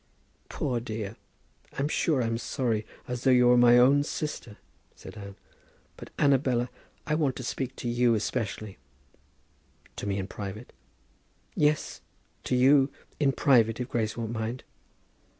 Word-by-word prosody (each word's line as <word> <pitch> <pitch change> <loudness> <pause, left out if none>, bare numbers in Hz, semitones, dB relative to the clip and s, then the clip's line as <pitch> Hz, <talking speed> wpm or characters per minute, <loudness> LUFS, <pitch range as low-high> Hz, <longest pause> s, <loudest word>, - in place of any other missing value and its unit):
"Poor 125 -4 -2
dear, 110 -2 -5 0.6
I'm 140 - 0
sure 150 -3 +1
I'm 115 0 -1
sorry 115 -5 -2 0.2
as 125 -1 -4
though 130 - +5
she 125 0 +5
were 125 0 +6
my 120 0 +6
own 135 +4 +5
sister," 145 -7 -5 0.4
said - - -12
Anne. 100 -2 -9 0.6
"But, - - -11
Annabella, 130 -3 +2 0.3
I 150 - -1
want 150 -5 +1
to 130 - -6
speak 130 +1 -4
to 120 - -6
you 120 0 +2
especially." 110 -2 -3 1.2
"To - - -4
me, 100 -1 -1
in 95 - -2
private?" 100 +4 -8 0.8
"Yes, 150 0 0 0.4
to 125 - 0
you; 135 +2 +5 0.3
in 140 -2 +3
private, 120 -5 +3
if 125 0 -4
Grace 110 -2 -2
won't 115 -1 -3
mind?" 115 +2 -4
120 Hz, 145 wpm, -28 LUFS, 110-135 Hz, 1.2 s, were